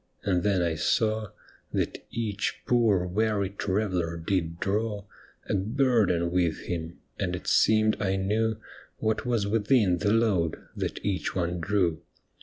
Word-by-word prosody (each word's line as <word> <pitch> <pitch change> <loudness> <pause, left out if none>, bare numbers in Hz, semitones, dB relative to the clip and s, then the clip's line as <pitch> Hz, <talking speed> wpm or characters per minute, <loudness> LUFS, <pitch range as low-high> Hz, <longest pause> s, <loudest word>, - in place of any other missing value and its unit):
And 90 -3 +1
then 100 -3 +2
I 85 -1 +1
saw 110 +7 +1 0.4
That - - -2
each 105 -3 -3
poor, 110 -7 +3
weary 100 +1 0
traveller 95 -4 -1
did 85 -1 -2
draw 105 +1 -1 0.4
A - - -1
burden 105 -5 +2
with 85 -3 +1
him, 85 -1 -5 0.2
and 90 -3 -1
it 90 - -8
seemed 110 0 +3
I 95 -1 +1
knew 110 +3 0 0.4
What 110 +1 -1
was 115 -4 +1
within 105 -3 +2
the 105 - +1
load 105 -8 +2 0.2
that - - -4
each 95 -2 -1
one 90 -1 -1
drew. 85 -3 0
100 Hz, 140 wpm, -27 LUFS, 90-110 Hz, 0.4 s, poor